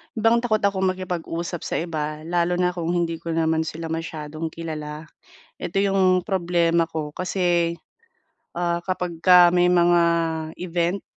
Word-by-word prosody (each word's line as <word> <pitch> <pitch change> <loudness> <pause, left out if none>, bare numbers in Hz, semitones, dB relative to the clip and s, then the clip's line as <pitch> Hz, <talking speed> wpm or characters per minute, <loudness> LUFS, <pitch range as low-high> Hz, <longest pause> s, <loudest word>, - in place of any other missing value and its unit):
'yon 220 - -3
bang 230 +1 +4
takot 215 -3 +1
akong 200 -1 +1
makipag-usap 175 -2 -4
sa - - -3
iba, 155 -2 -3
lalo 175 +1 0
na 180 0 +1
kung 170 0 -2
hindi 170 -1 0
ko 165 0 -5
naman 160 0 +1
sila 165 +1 -5
masyadong 160 -1 -5
kilala. 155 -1 -6 0.5
Eto 185 - -3
yung 190 -2 +2
problema 170 -3 +1
ko 155 -2 -5
kasi, 175 -2 0 0.8
ah, 170 0 0
kapagka 180 -1 +4
may 180 0 +3
mga 175 -1 +4 0.6
event 175 +2 -1
170 Hz, 140 wpm, -23 LUFS, 165-180 Hz, 0.8 s, bang